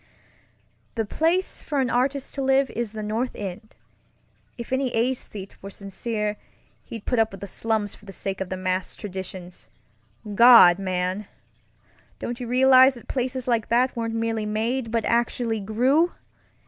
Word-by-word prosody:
"The 225 -2 -1
place 335 - 0
for 290 -2 -2
an 255 -2 +1
artist 265 +2 0
to 275 - -3
love 270 0 +2
is 235 -3 -4
the 215 -1 -5
North 225 +4 -2
End. 205 +2 -7 0.8
If 235 +1 -6
any 260 -1 0
esthete 225 -5 -3
were 195 - -7
sincere, 210 +2 -4 0.5
he'd 225 -3 -9
put 245 - 0
up 220 0 +3
with 195 - -10
the 200 - -6
slums 210 +1 -2
for 210 - -16
the 195 - -9
sake 195 0 -5
of 190 - -3
the 185 - -3
massed 185 0 -2
traditions. 185 -3 -8 0.6
God, 230 -6 +8
man! 185 +1 -2 0.9
Don't 240 +1 -5
you 245 - -5
realize 260 +1 +6
that 240 - -13
places 255 -1 -3
like 235 -3 +1
that 250 +2 +2
weren't 230 -1 -2
merely 225 -1 -1
made, 230 +3 -1
but 230 -1 -1
actually 235 -1 0
grew? 255 - +2
225 Hz, 160 wpm, -24 LUFS, 200-255 Hz, 0.9 s, God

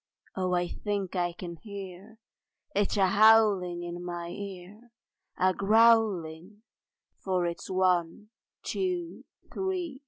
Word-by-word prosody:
Oh 185 -1 0
I 175 0 0
think 200 -1 -4
I 175 -1 0
can 170 0 -8
hear 200 +1 -10 0.6
It 205 0 0
a 195 - +4
howling 200 -4 +4
in 175 0 -6
my 175 -1 -5
ear, 200 +4 -9 0.5
A 185 0 +3
growling 210 -3 +2 0.6
for 185 -2 -1
its 170 0 -5
One, 185 +2 0 0.3
Two, 360 -3 -3 0.3
Three! 360 -7 -3
190 Hz, 115 wpm, -28 LUFS, 175-215 Hz, 0.6 s, a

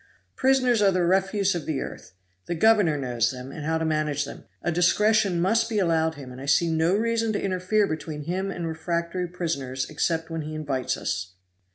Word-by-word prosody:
Prisoners 255 -4 +3
are 200 - +5
the 185 -2 +1
refuse 190 +2 +2
of 170 -3 -4
the 150 -4 -1
earth. - - -8 0.3
The 175 - -2
governor 205 -4 +4
knows 120 -4 0
them, 130 +1 -7
and 150 - -7
how 160 +2 0
to 160 - -1
manage 150 -2 0
them. 140 - -10 0.2
A 175 - 0
discretion 200 +2 +3
must 225 +6 +2
be 220 - -1
allowed 160 -4 +2
him, 135 -3 -9
and 125 +1 -9
I 140 - -7
see 165 +4 +3
no 160 +3 +2
reason 230 +1 +1
to - - 0
interfere 190 +2 +1
between 155 -3 -5
him 185 +5 -2
and 175 -3 -4
refractory 170 +2 -2
prisoners 140 -7 -3
except 165 +2 -1
when 165 0 -2
he 155 +1 -6
invites 140 -5 -2
us." 90 +1 -3
170 Hz, 200 wpm, -25 LUFS, 150-195 Hz, 0.3 s, are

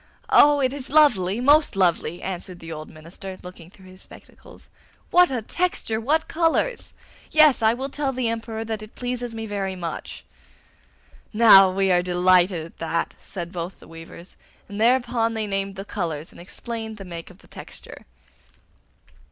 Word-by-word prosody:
'Oh, 290 -1 +6
it 260 0 +1
is 280 -2 -7
lovely, 235 -10 +3
most 290 0 +4
lovely!' 175 -2 0
answered 185 -1 -6
the 165 -1 -10
old 155 -1 -8
minister, 175 +4 -10
looking 180 -2 -12
through 190 0 -19
his 185 0 -15
spectacles. - - -16 0.4
'What 355 0 +5
a 250 -4 -3
texture! 230 -7 -2
What 310 +7 0
colours! 335 +9 -1 0.3
Yes, 305 -5 +5
I 220 +1 +3
will 265 +2 -4
tell 280 0 -2
the 255 -2 -2
Emperor 225 -1 -4
that 220 -1 -4
it 215 +1 -12
pleases 245 -1 -4
me 225 0 -5
very 195 -3 -3
much.' 170 -2 -7 1.1
'Now 205 -4 +7
we 190 0 +1
are 175 -1 +3
delighted 180 -1 +2
at 165 - -16
that,' 165 0 -2
said 175 -3 -7
both 175 0 -6
the - - -16
weavers, 165 +2 -12 0.3
and 205 +1 -6
thereupon 235 -1 +2
they 220 -1 -2
named 195 -1 -3
the 195 +1 -7
colours 165 -6 -5
and - - -13
explained 220 +3 -7
the 195 - -9
make 170 -2 -8
of 185 - -16
the - - -19
texture. - - -12
205 Hz, 170 wpm, -23 LUFS, 180-245 Hz, 1.1 s, Now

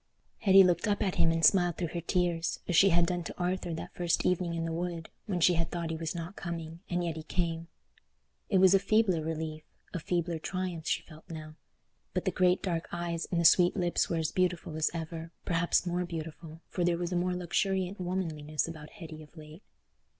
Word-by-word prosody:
Hetty 195 -3 +7
looked 180 +3 +2
up 205 -1 +1
at 190 -3 -1
him 165 - +4
and 165 -1 +2
smiled 175 +1 +4
through 170 -3 -2
her 170 +1 -4
tears, 170 -1 0
as 175 - 0
she 195 +5 +7
had 170 -1 +4
done 175 0 -2
to - - -7
Arthur 180 0 -1
that - - -7
first 175 -2 0
evening 180 -2 +1
in 165 0 -2
the 165 - -2
wood, 170 -1 -4 0.2
when 185 -4 -1
she 175 +1 +5
had 165 -1 0
thought 170 -2 -3
he - - -2
was 160 +1 -4
not 170 +3 -5
coming, 165 -2 -6
and 175 0 0
yet 165 -2 -2
he - - -4
came. 165 0 -2 0.8
It 195 - +3
was 190 0 +7
a 195 - +6
feebler 200 -4 +2
relief, 160 -1 -4 0.3
a 180 - -2
feebler 170 0 -1
triumph 175 -1 -4
she - - 0
felt 155 +1 -15
now, 155 -1 -7 0.6
but 185 - -1
the 190 - +2
great 180 +1 +2
dark 170 -3 -1
eyes 170 -1 -3
and 175 - 0
the 170 - +1
sweet 175 +2 +6
lips 175 -2 +1
were 170 - 0
as 160 -1 0
beautiful 180 -3 0
as 155 0 +2
ever, 165 0 -6
perhaps 175 +1 +2
more 175 0 0
beautiful, 165 -1 -7
for 180 - -2
there 170 -1 +2
was 175 0 -3
a - - -1
more 180 +1 +1
luxuriant 190 +2 -1
womanliness 160 -5 -2
about 155 -2 -8
Hetty 160 -2 -10
of 155 +2 -16
late. 155 +3 -11
170 Hz, 215 wpm, -30 LUFS, 165-180 Hz, 0.8 s, Hetty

